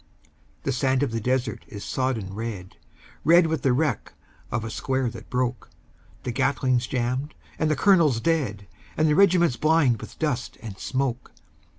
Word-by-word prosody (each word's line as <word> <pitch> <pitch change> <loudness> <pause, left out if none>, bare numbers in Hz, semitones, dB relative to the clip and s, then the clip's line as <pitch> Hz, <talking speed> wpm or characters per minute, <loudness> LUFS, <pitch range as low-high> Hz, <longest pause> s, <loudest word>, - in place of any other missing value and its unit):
The 135 - 0
sand 130 +1 +1
of 140 - -1
the 115 0 -2
desert 125 -1 -1
is 105 -7 -8
sodden 120 -7 -2
red, 105 -4 -6 0.5
Red 170 +1 +6
with 160 -3 -1
the 135 - +2
wreck 150 +5 0 0.4
of 115 0 -1
a 110 - -5
square 130 -1 -1
that 110 -1 -11
broke; 125 -1 -2 0.5
The 125 - -2
Gatling's 125 0 +1
jammed 130 +3 -2 0.2
and 155 - +2
the 155 - +2
colonel 170 -3 +5
dead, 115 -6 -1 0.3
And 155 - +3
the 150 - +3
regiment 175 -8 +4
blind 150 -8 +3
with - - -10
dust 145 -6 -2
and 105 -4 -6
smoke. 130 -2 -2
130 Hz, 165 wpm, -25 LUFS, 115-150 Hz, 0.5 s, Red